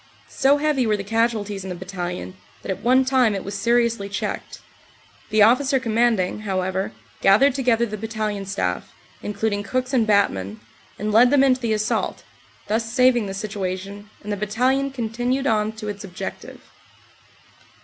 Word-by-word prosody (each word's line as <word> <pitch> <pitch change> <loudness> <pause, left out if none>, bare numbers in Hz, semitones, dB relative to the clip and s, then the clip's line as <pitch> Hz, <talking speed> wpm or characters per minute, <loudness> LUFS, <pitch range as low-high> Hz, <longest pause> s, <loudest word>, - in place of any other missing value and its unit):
So 275 +2 +3
heavy 290 -5 +1
were 210 -1 +2
the 200 - -5
casualties 215 -2 -1
in 190 - -6
the 180 - -4
Battalion, 180 0 -5 0.3
that - - -3
at 190 - -4
one 260 +2 +4
time 255 -5 +3
it 195 - -4
was 200 - -6
seriously 230 -1 +1
checked. 200 - -4 0.7
The 215 -1 +5
Officer 265 +5 +4
Commanding, 225 -5 +1
however, 190 -2 -2 0.3
gathered 235 +8 +5
together 245 -3 +2
the 215 -2 -6
battalion 215 -2 -3
staff, 195 +1 -3 0.3
including 210 0 -2
cooks 255 +5 -2
and 235 -4 +3
batmen, 105 - +1 0.4
and 215 +1 -2
led 235 +4 +6
them 275 0 +4
into 260 -1 +3
the 230 -2 0
assault, 215 0 -1 0.4
thus 225 +1 -1
saving 250 -4 +3
the 195 - -5
situation, 200 0 -5
and 210 0 -3
the - - -3
Battalion 250 +7 +1
continued 245 +1 -2
on 215 -4 +1
to 220 -1 -7
its 205 0 -5
objective. 185 -2 -7
215 Hz, 160 wpm, -22 LUFS, 200-245 Hz, 0.7 s, led